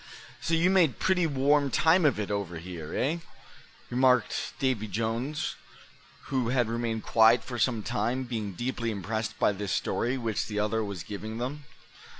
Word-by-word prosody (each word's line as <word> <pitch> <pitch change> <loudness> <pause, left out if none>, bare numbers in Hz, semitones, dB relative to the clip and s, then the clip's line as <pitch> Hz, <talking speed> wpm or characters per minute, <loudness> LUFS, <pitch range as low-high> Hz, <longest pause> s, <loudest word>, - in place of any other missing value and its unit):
"So 165 - +1
you 175 +3 +3
made 175 -8 +4
pretty 180 -3 +2
warm 140 0 +2
time 160 +7 +4
of 135 -7 +3
it 105 -1 -2
over 100 -4 -2
here, 85 -2 -7
eh?" 150 +6 +1 0.7
remarked 125 -1 +2
Davy 130 -5 0
Jones, 115 +8 -2 0.7
who 130 -4 -1
had 125 -2 +2
remained 115 -1 -2
quiet 115 +1 +5
for 120 -2 -6
some 115 -4 +1
time, 120 +7 -1
being 110 -5 -4
deeply 120 +3 -2
impressed 110 +1 -3
by 105 - +3
this 100 -1 -4
story 125 +3 0
which 115 -4 -2
the 105 - -5
other 105 +2 +1
was 100 -5 -5
giving 110 +2 -6
them. 135 +4 -4
115 Hz, 160 wpm, -28 LUFS, 105-130 Hz, 0.7 s, quiet